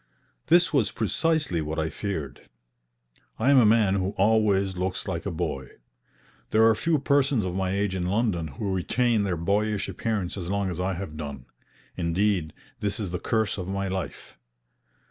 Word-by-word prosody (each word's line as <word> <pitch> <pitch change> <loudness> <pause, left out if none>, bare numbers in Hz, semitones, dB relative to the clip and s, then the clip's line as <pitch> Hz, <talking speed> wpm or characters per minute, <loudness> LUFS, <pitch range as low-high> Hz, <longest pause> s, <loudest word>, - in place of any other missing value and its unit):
This 175 0 +4
was 120 -9 +3
precisely 145 - 0
what 75 +1 -4
I 80 0 -1
feared. 90 -9 -5 0.9
I 125 +5 +3
am 140 - +7
a 115 - +6
man 110 -3 +4
who 95 +1 -1
always 100 -2 +3
looks 90 +1 -2
like - - -3
a - - -2
boy. 65 -1 -3 0.8
There 110 +1 +5
are 115 - +6
few 160 +8 +1
persons 140 -5 +2
of 90 - -3
my 95 -1 0
age 100 0 0
in 90 -2 -2
London 100 -5 0
who 95 +8 -4
retain 115 +5 +1
their 90 -3 -1
boyish 100 +4 0
appearance 105 -5 -2
as 90 -2 -5
long 100 -1 0
as 90 - -5
I 95 +1 0
have 80 -4 -6
done; 70 -4 -6 0.5
indeed, 90 -1 0 0.3
this 105 +2 -2
is 100 -5 -3
the 90 - -2
curse 110 -2 0
of 90 0 -5
my 100 0 -2
life. 95 0 -5
100 Hz, 175 wpm, -26 LUFS, 90-110 Hz, 0.9 s, am